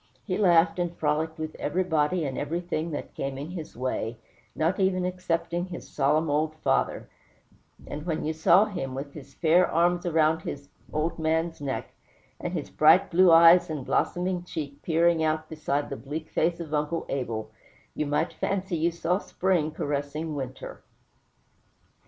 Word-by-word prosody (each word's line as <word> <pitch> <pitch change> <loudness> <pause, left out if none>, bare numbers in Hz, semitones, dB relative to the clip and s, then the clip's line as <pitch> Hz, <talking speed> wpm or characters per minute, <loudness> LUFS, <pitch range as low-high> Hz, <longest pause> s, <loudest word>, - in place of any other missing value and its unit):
He 185 - -1
laughed 175 -3 +4
and 175 -1 -2
frolicked 160 +2 0
with 155 0 -5
everybody 175 -2 0
and 135 -2 -3
everything 170 +1 -2
that 150 - -6
came 135 -1 -4
in 145 +5 -6
his 165 -8 -8
way, 120 -2 -2 0.4
not 165 +5 0
even 185 -1 +2
excepting 175 -1 -2
his 180 -2 -8
solemn 150 +4 +1
old 155 +2 0
father; 155 - 0 0.8
and 150 - -6
when 160 -3 -1
you 155 - 0
saw 170 +5 +5
him, 175 -11 -5
with 140 +1 -6
his 140 -2 -12
fair 175 +2 +4
arms 175 +2 +2
around 160 -1 +2
the 145 - -5 0.3
old 155 +2 -1
man's 160 0 0
neck, 135 -2 -4 0.5
and - - -4
his - - -4
bright - - +5
blue 180 +1 +6
eyes 165 +2 +7
and 150 -5 -4
blooming 180 0 0
cheek 145 -5 -6
peering 165 0 +2
out 155 0 0
beside 145 -2 -2
the - - -2
bleak 155 +3 -6
face 170 +1 +1
of 160 -3 -6
Uncle 150 +2 -1
Abel, 110 -5 -3 0.4
you 150 - -2
might 150 +4 0
fancy 190 -2 -2
you 165 +2 +2
saw 170 +2 -1
spring 180 -6 0
caressing 145 +1 -3
winter. 130 -3 -6
160 Hz, 160 wpm, -27 LUFS, 150-175 Hz, 0.8 s, eyes